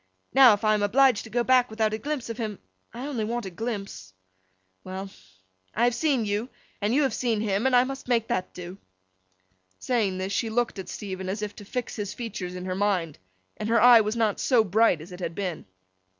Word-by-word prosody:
Now, 260 -4 +8
if 205 - -3
I 215 0 +4
am 210 - +1
obliged 245 +2 +4
to - - -10
go 240 +2 0
back 255 0 +4
without 220 -1 0
a 215 - -2
glimpse 290 0 -3
of 230 0 -6
him—I 210 - -8
only 265 -7 -2
want 235 +1 -3
a 190 - -6
glimpse—well! 95 - -8 0.6
I 230 - +1
have 245 0 +3
seen 270 -4 +1
you, 210 +4 -2 0.3
and 205 +2 +1
you 290 +4 +3
have 265 -4 0
seen 230 -3 0
him, 210 +2 0
and 260 - +3
I 245 - +6
must 270 0 -6
make 235 -3 +1
that 235 -6 -2
do.' 180 +2 -9 1.0
Saying 205 - 0
this, 190 +1 -3
she 230 - 0
looked 235 -2 -1
at 190 - -7
Stephen 190 -2 -5
as 210 +3 -3
if 210 -1 -5
to 205 - -10
fix 245 +3 -4
his 205 -1 -4
features 200 -7 -5
in 180 0 -6
her 185 - -2
mind, 185 -5 -1 0.4
and 215 - -4
her 230 0 +4
eye 240 -2 +8
was 215 +1 -2
not 220 -3 +1
so 245 -4 +3
bright 215 -4 +3
as 170 +4 -11
it 180 - -9
had 170 -2 -4
been. 185 - -4
215 Hz, 215 wpm, -26 LUFS, 185-240 Hz, 1.0 s, Now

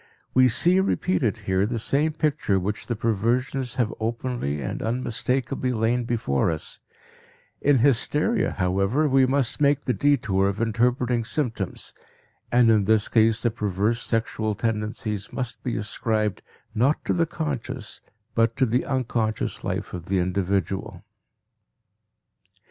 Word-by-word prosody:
We 130 0 +6
see 175 +10 +3
repeated 180 - +1
here 95 +1 +2
the 115 +1 -2
same 145 +7 +1
picture 150 -11 +1
which 100 +3 -4
the 120 - -1
perversions 120 +4 0
have 120 -4 0
openly 115 - -2
and 65 - -4
unmistakably 125 +2 -1
lain 115 +2 +1
before 110 - 0
us; 80 -2 -3 0.8
in 145 -1 +4
hysteria, 145 - +2
however, 95 +10 +1
we 135 -1 +4
must 135 +1 0
make 145 0 +3
the 125 - -1
detour 110 -10 +2
of 100 - -4
interpreting 120 +1 +1
symptoms, 115 - -3 0.6
and 120 -1 +5
in 105 -3 +3
this 110 0 +2
case 110 -1 +3
the 120 - +2
perverse 105 +1 -1
sexual 110 -2 -1
tendencies 105 -1 -3
must 125 -3 -4
be 125 - -2
ascribed 110 -1 -1 0.3
not 135 +7 +1
to - - +1
the 170 -1 +1
conscious 130 -8 -5 0.3
but 115 0 +2
to 130 - +4
the 125 +2 +1
unconscious 120 -4 -1
life - - -3
of 85 -1 -6
the 95 - +1
individual. 95 +1 -1
115 Hz, 135 wpm, -24 LUFS, 105-130 Hz, 0.8 s, We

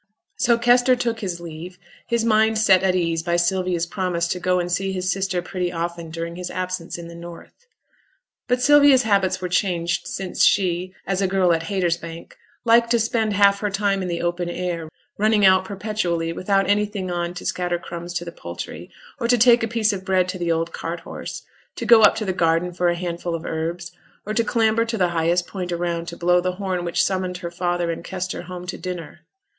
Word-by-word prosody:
So 235 -1 +3
Kester 245 +2 +4
took 235 -2 -2
his 185 -5 -4
leave, 170 +2 -9 0.3
his 235 -1 0
mind 220 0 +3
set 195 -4 +5
at 190 -1 +2
ease 165 -2 0
by 170 +1 -1
Sylvia's 175 0 +1
promise 170 -1 -1
to 180 - -2
go 180 0 +1
and 175 0 -2
see 195 +2 0
his 185 -1 -1
sister 190 -2 -1
pretty 180 -1 -3
often 170 -1 -4
during 165 +1 -5
his 180 -1 -5
absence 185 -2 -4
in 170 -1 -8
the 170 - -10
North. 170 - -12 0.8
But 250 0 +1
Sylvia's 285 -2 +6
habits 195 -4 +1
were 180 - -2
changed 175 -2 0
since 190 -1 -2
she, 185 -1 +2
as 195 0 -1
a 195 - +2
girl 185 -2 +3
at 165 0 -1
Haytersbank, 170 -3 -3 0.3
liked 235 0 +5
to 235 0 +3
spend 225 -1 0
half 200 0 +4
her 210 - -1
time 195 -1 0
in 185 - -3
the 170 -1 -3
open 175 0 -1
air, 175 -2 -3 0.3
running 215 -1 +4
out 185 0 +5
perpetually 190 -5 -2
without 195 +3 +1
anything 205 -2 0
on 175 0 -2
to 180 - -7
scatter 175 -1 -1
crumbs 175 0 -7
to 175 - -2
the 170 - -6
poultry, 85 - -8 0.3
or 235 - 0
to 245 +1 +4
take 240 +1 +6
a 225 - 0
piece 220 -2 +1
of 190 -1 -5
bread 185 -1 +2
to 185 0 -4
the 170 -1 0
old 165 +1 -1
cart 170 +1 -5
horse, - - -7 0.3
to - - -5
go 230 -2 +7
up 210 - +6
to 215 - -3
the 190 - -1
garden 165 +1 +1
for 175 0 +1
a 175 - +1
handful 170 -1 -3
of 165 - -6
herbs, 170 +2 -4 0.3
or 215 - -3
to 230 +1 +2
clamber 225 0 +2
to 230 0 -3
the 180 -3 +2
highest 170 +1 +1
point 180 -2 -5
around 170 -1 -2
to 170 - -7
blow 180 +1 +3
the 185 0 -1
horn 185 -2 -3
which 170 -1 +1
summoned 185 -1 -1
her 170 -1 -6
father 175 -1 -1
and 165 - -6
Kester 185 -1 -4
home 180 0 -8
to 175 - -6
dinner. 175 -4 -6
180 Hz, 215 wpm, -22 LUFS, 170-200 Hz, 0.8 s, go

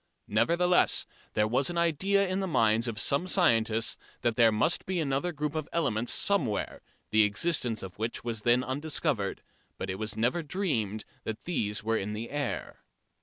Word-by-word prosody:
Nevertheless 170 +12 +3 0.3
there 105 0 +3
was 130 +6 +1
an 175 - -4
idea 190 +4 +2
in 185 +1 -1
the 190 - -1
minds 115 -6 +2
of 110 -2 -2
some 140 +10 +1
scientists 115 - +2 0.2
that 120 -2 0
there 115 -1 +5
must 110 +10 +1
be 185 -1 -1
another 145 +3 -1
group 150 -2 -3
of 155 -2 -4
elements 120 -8 0
somewhere, 195 - 0 0.3
the 110 0 +5
existence 115 +1 +1
of 95 +1 -9
which 115 +1 -3
was 115 -2 -3
then 120 +3 +3
undiscovered, 140 -5 -2 0.3
but 95 - -3
it 95 - -6
was 110 -1 -3
never 125 +10 +1
dreamed 140 - -2 0.2
that 110 -1 -5
these 105 -12 -2
were 115 +1 +1
in 105 +1 -3
the 110 +2 -6
air. 145 -3 -4
120 Hz, 170 wpm, -29 LUFS, 110-170 Hz, 0.3 s, there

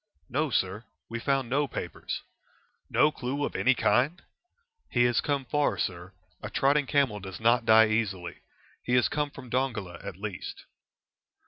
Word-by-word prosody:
"No, 150 +4 0
sir; 100 -2 0 0.3
we 115 +1 -4
found 135 0 0
no 140 +4 +1
papers." - - -5 0.7
"No 150 - +4
clue 140 +1 -2
of - - -5
any 130 0 +3
kind?" 135 +9 +2 0.7
"He 120 - +3
has 120 -1 +3
come 140 -2 -1
far, 145 +3 +1
sir. 90 0 -3 0.3
A - - -5
trotting 140 0 +2
camel 135 -8 +2
does 95 -2 -8
not 115 +1 +3
die 110 0 +7
easily. 95 -6 -1 0.4
He 125 - 0
has 125 - +4
come 150 -1 -1
from 130 -3 -12
Dongola, 115 -9 -2
at 100 -3 -7
least." 100 -2 -6
120 Hz, 155 wpm, -28 LUFS, 105-140 Hz, 0.7 s, die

